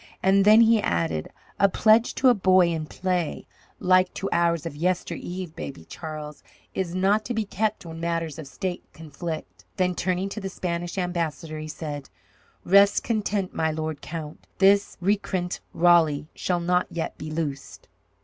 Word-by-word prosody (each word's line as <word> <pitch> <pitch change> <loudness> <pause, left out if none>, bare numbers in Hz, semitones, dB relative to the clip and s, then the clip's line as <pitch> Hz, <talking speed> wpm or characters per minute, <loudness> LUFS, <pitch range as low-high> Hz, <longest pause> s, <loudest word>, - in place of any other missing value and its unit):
And 195 +1 +4
then 215 +2 +8
he 225 -1 +5
added, 80 - -1 0.3
"A 200 - +5
pledge 220 +4 +4
to 260 - +5
a - - +7
boy 185 -4 +4
in 160 -2 -3
play, 180 -2 -2 0.3
like 185 0 +4
to 195 - -3
ours 170 -1 +1
of 165 - -5
yester 180 +4 -1
eve, 180 -2 -6
Baby 80 -12 -7
Charles, 150 - -8 0.3
is 180 -2 -3
not 200 +3 +2
to 240 - -3
be 220 -1 0
kept 205 -1 -2
when 165 -1 -8
matters 165 -2 -2
of 155 - -7
state 180 +5 -4
conflict." 160 +1 -7
Then 180 -1 +2
turning 185 +2 -1
to 215 - -6
the 195 - -4
Spanish 175 -1 -4
ambassador, 170 -3 -2
he 155 - -6
said: 150 -3 -6 0.6
"Rest 200 +2 +5
content, 205 -4 -1
my 160 - 0
lord 155 -1 -4
count. 155 -2 -7
This 200 +1 +4
recreant 185 -2 -1
Raleigh 165 -4 +4
shall 180 -1 -1
not 180 +1 +1
yet 165 - -4
be 155 - -6
loosed." 150 -3 -5
175 Hz, 165 wpm, -25 LUFS, 160-195 Hz, 0.6 s, then